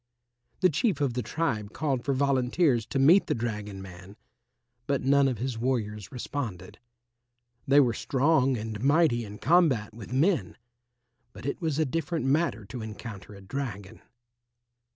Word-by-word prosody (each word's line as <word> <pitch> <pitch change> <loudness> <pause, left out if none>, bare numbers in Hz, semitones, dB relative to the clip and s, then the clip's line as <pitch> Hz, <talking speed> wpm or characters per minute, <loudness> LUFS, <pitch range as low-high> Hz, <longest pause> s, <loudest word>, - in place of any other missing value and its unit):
The 185 - +5
Chief 185 - 0
of 140 -4 0
the 125 - -1
tribe 115 -9 -2
called 135 -5 -1
for 140 - 0
volunteers 130 -2 +2
to - - -3
meet 160 +9 +5
the - - 0
dragon 105 -4 -4
man, 95 +1 -12 0.7
but 140 -2 0
none 140 +1 +4
of 130 -3 -1
his 120 0 -3
warriors 110 -5 -2
responded. 120 - -5 0.9
They 140 +1 +6
were 125 -5 +4
strong 135 +1 +2
and 110 -1 -5
mighty 140 -4 +3
in 105 -1 -9
combat 140 -8 +2
with 115 0 -10
men, 135 - +1 0.8
but - - -11
it 140 - -3
was 160 -4 -1
a 160 - +2
different 165 +2 -2
matter 135 - +1
to 115 +4 -7
encounter 105 -2 -8
a 100 - -12
dragon. 100 -3 -6
130 Hz, 150 wpm, -28 LUFS, 105-145 Hz, 0.9 s, They